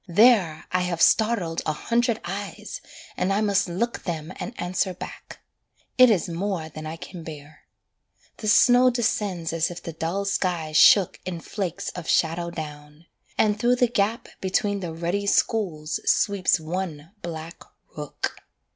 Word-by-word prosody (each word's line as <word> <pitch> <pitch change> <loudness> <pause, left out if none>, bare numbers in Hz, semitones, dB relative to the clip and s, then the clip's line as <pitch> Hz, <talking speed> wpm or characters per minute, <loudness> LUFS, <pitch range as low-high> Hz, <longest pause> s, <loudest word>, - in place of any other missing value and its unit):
There, 185 -5 +4
I 185 - +2
have 180 -2 -2
startled 200 -8 +3
a 155 - -1
hundred 235 +6 0
eyes, 200 - -6 0.3
and 185 - 0
I 200 +2 +2
must 200 -2 +2
look 235 +8 -2
Them 165 -1 -4
an - - -5
answer 180 +1 -1
back. - - -10 0.5
It 255 -1 +8
is 205 -3 +2
more 170 -1 -3
than 155 0 -8
I 160 - -5
can 175 +1 -9
bear. 150 -1 -11 0.7
The 215 - -5
snow 245 +3 +6
descends 205 -8 -1
as 165 +1 +1
if 175 0 -8
the 165 - -6
dull 170 +5 -2
sky 180 -5 -1
shook 175 +5 +6
In 175 -2 -4
flakes 185 0 -4
of 175 -3 -7
shadow 170 +1 +1
down; 150 -1 -8 0.3
and 210 -1 +2
through 245 +1 +3
the 245 0 +3
gap 225 +1 0
Between 200 +2 0
the 175 -3 -4
ruddy 175 +5 -2
schools 165 -9 +1
sweeps 200 -4 +2
one 160 -1 -5
black 165 0 -7 0.3
rook. 150 -2 -4
180 Hz, 155 wpm, -25 LUFS, 165-205 Hz, 0.7 s, It